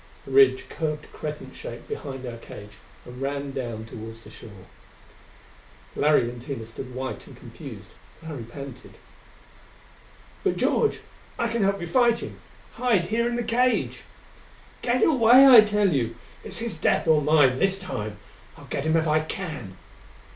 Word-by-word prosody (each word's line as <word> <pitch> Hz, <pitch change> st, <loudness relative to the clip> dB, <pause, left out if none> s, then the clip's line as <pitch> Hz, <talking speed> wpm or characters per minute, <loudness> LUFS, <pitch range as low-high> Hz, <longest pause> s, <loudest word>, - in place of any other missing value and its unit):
The -, -, -9 dB
ridge 400 Hz, -2 st, +5 dB
curved 150 Hz, -2 st, -4 dB
crescent 150 Hz, -3 st, -6 dB
shaped 120 Hz, -, -8 dB
behind 135 Hz, -2 st, -6 dB
our 120 Hz, -1 st, -6 dB
cage 105 Hz, -2 st, -12 dB, 0.3 s
and 125 Hz, +1 st, -10 dB
ran 140 Hz, 0 st, -3 dB
down 120 Hz, -4 st, -5 dB
toward 115 Hz, 0 st, -9 dB
the 115 Hz, -, -14 dB
shore. 100 Hz, -4 st, -13 dB, 1.3 s
Larry 145 Hz, -4 st, +3 dB
and 120 Hz, 0 st, -7 dB
Tina 125 Hz, -3 st, -6 dB
stood 125 Hz, +3 st, -9 dB
white 130 Hz, 0 st, -5 dB
and -, -, -13 dB
confused. -, -, -11 dB, 0.3 s
Larry 155 Hz, -6 st, -6 dB
panted, 130 Hz, +1 st, -10 dB, 1.5 s
"But, -, -, +1 dB
George. 440 Hz, -, +1 dB, 0.4 s
I 235 Hz, -, 0 dB
can 230 Hz, 0 st, -1 dB
help 195 Hz, 0 st, +2 dB
you 175 Hz, -, -4 dB
fight 235 Hz, +5 st, +3 dB
him! -, -, -8 dB, 0.4 s
Hide 230 Hz, -8 st, +2 dB
here 235 Hz, +2 st, +1 dB
in 240 Hz, -, -2 dB
the 240 Hz, -, -1 dB
cage 250 Hz, +2 st, +1 dB, 0.4 s
" -, -, -26 dB
"Get 245 Hz, +1 st, +1 dB
away, 255 Hz, -2 st, +7 dB
I 245 Hz, -4 st, +11 dB
tell 210 Hz, -3 st, +2 dB
you! 115 Hz, -4 st, -1 dB, 0.3 s
It's -, -, -6 dB
his 225 Hz, -8 st, -4 dB
death -, -, +1 dB
or 155 Hz, -2 st, +5 dB
mine 145 Hz, -4 st, +4 dB
this 195 Hz, 0 st, +3 dB
time! 110 Hz, -, -5 dB, 0.4 s
I'll -, -, -13 dB
get 140 Hz, -, -3 dB
him 160 Hz, +1 st, +3 dB
if 160 Hz, 0 st, +1 dB
I 155 Hz, 0 st, +3 dB
can!" 155 Hz, -, -6 dB
150 Hz, 160 wpm, -25 LUFS, -, 1.5 s, I